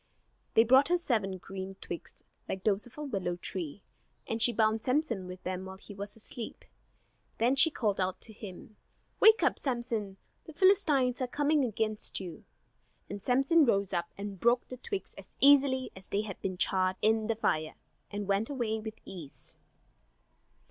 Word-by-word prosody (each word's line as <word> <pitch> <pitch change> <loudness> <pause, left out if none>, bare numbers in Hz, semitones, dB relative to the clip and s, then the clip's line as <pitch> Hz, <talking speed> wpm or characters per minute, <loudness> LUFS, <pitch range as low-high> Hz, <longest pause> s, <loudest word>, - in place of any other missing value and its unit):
They 225 - +7
brought 260 +4 +6
her 355 - +4
seven 215 - -1
green 190 +1 -7
twigs, 170 -2 -8 0.3
like 190 - -4
those 210 +1 +1
of 245 - -19
a 300 - -5
willow 195 -10 -2
tree; 175 0 -6 0.4
and 225 0 -3
she 240 - +6
bound 220 -1 +1
Samson 250 -8 0
with 180 0 -9
them 185 0 -3
while 190 0 -8
he 205 - -12
was 200 +1 -7
asleep. 225 +1 -6 0.7
Then 245 +4 +3
she 310 +4 +7
called 215 -10 -1
out 185 0 -1
to 220 - -9
him: 205 +1 -10 0.4
"Wake 440 +1 +7
up, - - +2
Samson, 235 -7 -2 0.3
the 320 - -10
Philistines 295 -9 +4
are 255 - 0
coming 290 +3 +2
against 215 -2 -1
you!" 175 -5 -8 0.7
And 205 0 -5
Samson 275 - +4
rose 200 -7 +1
up 170 -1 -2
and 200 -1 -6
broke 240 +3 +2
the 255 - -7
twigs 400 - -5
as - - -12
easily 270 -2 +5
as 190 0 -12
if - - -20
they 200 - 0
had 210 -3 -7
been 185 -1 -3
charred 185 0 +1
in 220 0 +3
the 225 - 0
fire, 155 -7 -1 0.3
and 205 -1 -4
went 200 +2 +1
away 235 -6 -1
with 220 0 -7
ease. 165 -7 -10
220 Hz, 175 wpm, -30 LUFS, 195-255 Hz, 0.7 s, They